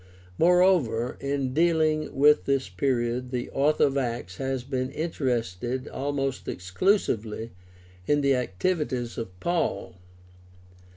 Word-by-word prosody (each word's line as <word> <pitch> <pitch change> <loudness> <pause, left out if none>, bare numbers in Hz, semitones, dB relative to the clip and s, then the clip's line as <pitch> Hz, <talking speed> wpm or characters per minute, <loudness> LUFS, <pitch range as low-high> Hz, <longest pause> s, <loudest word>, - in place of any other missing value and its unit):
Moreover, 170 -10 +3
in 140 -2 -2
dealing 155 -1 +2
with 150 +2 +5
this 135 -1 0
period 125 -2 -1
the 125 -1 -4
author 145 +3 +2
of 140 -1 +2
Acts 115 -8 -4
has 135 -1 -2
been 130 -1 -2
interested 125 - -2
almost 135 -1 -3
exclusively 110 - 0 0.6
in 145 0 +3
the 140 -1 +3
activities 125 - -1
of 95 -5 -7
Paul. 170 - -1
135 Hz, 110 wpm, -26 LUFS, 120-150 Hz, 0.6 s, with